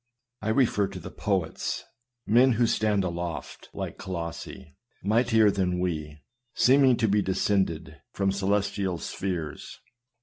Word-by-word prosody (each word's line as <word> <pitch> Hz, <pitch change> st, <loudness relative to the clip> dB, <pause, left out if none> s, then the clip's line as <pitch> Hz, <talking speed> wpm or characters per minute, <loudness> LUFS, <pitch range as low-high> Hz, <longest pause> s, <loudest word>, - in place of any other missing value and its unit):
I 110 Hz, -, -2 dB
refer 110 Hz, -4 st, +2 dB
to -, -, -8 dB
the -, -, -9 dB
poets, 95 Hz, -6 st, -2 dB, 0.4 s
men 125 Hz, +4 st, +5 dB
who 120 Hz, +1 st, +3 dB
stand 105 Hz, -3 st, +1 dB
aloft 85 Hz, -4 st, -5 dB
like -, -, -6 dB
Colossi, 85 Hz, -3 st, -6 dB, 0.3 s
mightier 110 Hz, 0 st, +4 dB
than 90 Hz, -2 st, 0 dB
we, 75 Hz, -4 st, -3 dB, 0.3 s
seeming 130 Hz, -1 st, +5 dB
to 110 Hz, -, +2 dB
be 105 Hz, 0 st, +3 dB
descended 95 Hz, -5 st, -1 dB
from 100 Hz, -3 st, 0 dB
celestial 100 Hz, -1 st, 0 dB
spheres. 85 Hz, -2 st, -5 dB
100 Hz, 125 wpm, -27 LUFS, 85-110 Hz, 0.4 s, men